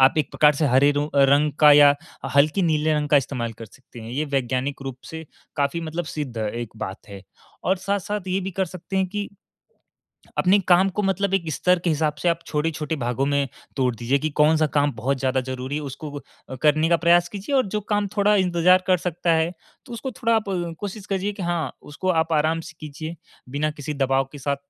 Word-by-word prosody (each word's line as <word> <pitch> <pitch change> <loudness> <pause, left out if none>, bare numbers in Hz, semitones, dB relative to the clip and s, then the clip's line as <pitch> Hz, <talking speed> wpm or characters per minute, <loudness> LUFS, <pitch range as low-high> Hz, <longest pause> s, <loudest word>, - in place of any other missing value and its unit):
आप 130 +1 +6
एक 145 -1 0
प्रकार 150 -1 +4
से 150 - 0
हरे 135 +3 +4
रो 145 +1 -1
रंग 140 +2 +4
का 150 -1 +8
या 145 0 +7 0.4
हल्के 155 +7 +4
नीले 155 -1 +2
रंग 150 -1 -1
का 145 - +5
इस्तेमाल 120 -4 -1
कर 115 - -8
सकते 125 +1 -15
हैं। 115 +1 -8
ये 145 +5 -1
वैज्ञानिक 135 +1 -1
रूप 135 -2 -6
से 160 0 -7 0.3
काफ़ी 145 +4 0
मतलब 165 +1 -4
सिद्ध 145 -6 -5
एक 110 +1 -3
बात 95 0 -7
है। 100 -1 -10 0.4
और 190 - +2
साथ-साथ 200 +1 -3
ये 190 +1 0
भी 190 - -4
कर 190 +1 -1
सकते 185 +2 -7
हैं 190 -1 +2
कि 205 +1 -4 1.1
अपने 195 +2 +4
काम 185 +2 +5
को 210 - +1
मतलब 195 0 0
एक 170 -4 -1
स्तर 180 +4 +2
के 170 - +2
हिसाब 150 -1 0
से 175 - +2
आप 170 0 +1
छोटे-छोटे 155 0 -2
भागों 125 +1 -1
में 140 -1 +1 0.3
तोड़ 125 -3 +1
दीजिए, 125 +5 0
कि 155 +2 -2
कौन-सा 155 +1 +3
काम 145 -1 +2
बहुत 135 +5 -1
ज़्यादा 130 0 0
ज़रूरी 130 +2 -5
है 150 - -3
उसको 145 +2 -7 0.5
करने 155 +1 +3
का 170 - +4
प्रयास 175 0 +5
कीजिए, 205 +8 -5
और 255 - +2
जो 210 +2 -2
काम 205 0 -1
थोड़ा 205 +1 +4
इंतजार 180 0 +3
कर 185 -1 +4
सकता 170 0 -1
है, 160 +1 +1 0.4
तो 240 - -10
उसको 235 +3 -5
थोड़ा 230 -2 0
आप 220 - 0 0.4
कोशिश 205 0 -6
कीजिए 195 +1 -1
कि 195 - -7
हाँ, 170 -5 -2
उसको 150 +6 -6
आप 165 - -7
आराम 160 +2 +2
से 160 -1 -11
कीजिए 155 +2 -7 0.3
बिना 145 +3 -1
किसी 150 0 -6
दबाव 135 -1 +1
के 145 - -9
साथ। 140 +1 -1
155 Hz, 215 wpm, -23 LUFS, 140-180 Hz, 1.1 s, का